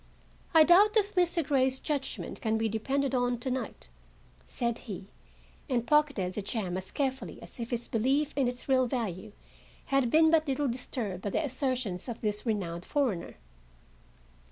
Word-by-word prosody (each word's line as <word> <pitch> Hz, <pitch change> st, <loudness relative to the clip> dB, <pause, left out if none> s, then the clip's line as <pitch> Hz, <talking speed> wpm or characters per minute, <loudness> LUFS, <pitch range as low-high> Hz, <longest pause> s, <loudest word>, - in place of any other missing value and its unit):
"I 320 Hz, -, +9 dB
doubt 405 Hz, +7 st, +6 dB
if 415 Hz, -1 st, +1 dB
Mr. 350 Hz, -3 st, +3 dB
Grey's 265 Hz, -2 st, +2 dB
judgment 285 Hz, -3 st, -3 dB
can 220 Hz, -1 st, +1 dB
be 225 Hz, 0 st, +1 dB
depended 270 Hz, +6 st, -1 dB
on, 245 Hz, -1 st, +1 dB
to 255 Hz, +2 st, -3 dB
night," 250 Hz, -, -4 dB, 0.6 s
said 235 Hz, -1 st, -1 dB
he, 200 Hz, -3 st, -8 dB, 0.6 s
and 240 Hz, -3 st, 0 dB
pocketed 285 Hz, -12 st, +2 dB
the 210 Hz, -, -3 dB
gem 200 Hz, -3 st, -3 dB
as 190 Hz, 0 st, -3 dB
carefully 265 Hz, -2 st, -3 dB
as -, -, -7 dB
if 235 Hz, 0 st, -4 dB
his 240 Hz, -1 st, -2 dB
belief 270 Hz, +6 st, +1 dB
in 275 Hz, -3 st, +2 dB
its 245 Hz, 0 st, -4 dB
real 260 Hz, -2 st, +3 dB
value 215 Hz, -5 st, -3 dB, 0.6 s
had 270 Hz, -3 st, +3 dB
been 320 Hz, +4 st, +5 dB
but 320 Hz, -1 st, +3 dB
little 275 Hz, +1 st, 0 dB
disturbed 235 Hz, -6 st, -4 dB
by 205 Hz, -, -2 dB
the 310 Hz, -, 0 dB
assertions 255 Hz, -7 st, -2 dB
of 235 Hz, -, -6 dB
this 210 Hz, +2 st, -2 dB
renowned 180 Hz, -6 st, -2 dB
foreigner. 245 Hz, -, -1 dB
250 Hz, 165 wpm, -30 LUFS, 220-280 Hz, 0.6 s, I